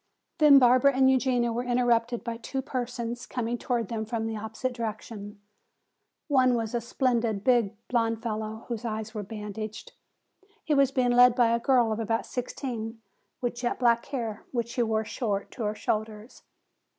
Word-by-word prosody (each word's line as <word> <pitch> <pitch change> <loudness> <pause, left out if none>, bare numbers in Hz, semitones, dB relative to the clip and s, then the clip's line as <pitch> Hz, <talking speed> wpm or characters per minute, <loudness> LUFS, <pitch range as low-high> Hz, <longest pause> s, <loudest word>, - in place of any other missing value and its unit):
Then 300 -2 +8
Barbara 255 +1 +5
and 265 0 +5
Eugenia 250 -3 +1
were 240 +2 -2
interrupted 240 -1 +1
by 235 -1 -4
two 265 +3 -4
persons 245 -2 -4
coming 240 -1 -2
toward 235 -4 -1
them 225 -2 -2
from 225 0 -3
the 225 0 -3
opposite 220 +4 -4
direction. 215 -2 -6 0.9
One 255 -4 +4
was 225 -1 -2
a 240 - 0
splendid, 235 -4 0
big 235 -4 +3
blond 230 -2 0
fellow 220 -1 -4
whose 235 -2 -4
eyes 220 -1 -4
were 215 - -3
bandaged. 210 +1 -7 0.7
He 310 - 0
was 275 -2 +4
being 255 -2 +1
led 245 0 +6
by 240 -2 +4
a 235 - +2
girl 240 -2 +3
of 215 - -2
about 225 0 -1
sixteen 235 -3 -5 0.4
with 245 -1 -1
jet 240 0 -2
black 235 -2 +2
hair 230 -6 -4
which 235 -2 -2
she 240 - -1
wore 220 -1 0
short 210 -3 -3
to 235 - -4
her 210 +1 -1
shoulders. 215 +2 -4
235 Hz, 170 wpm, -27 LUFS, 220-250 Hz, 0.9 s, Then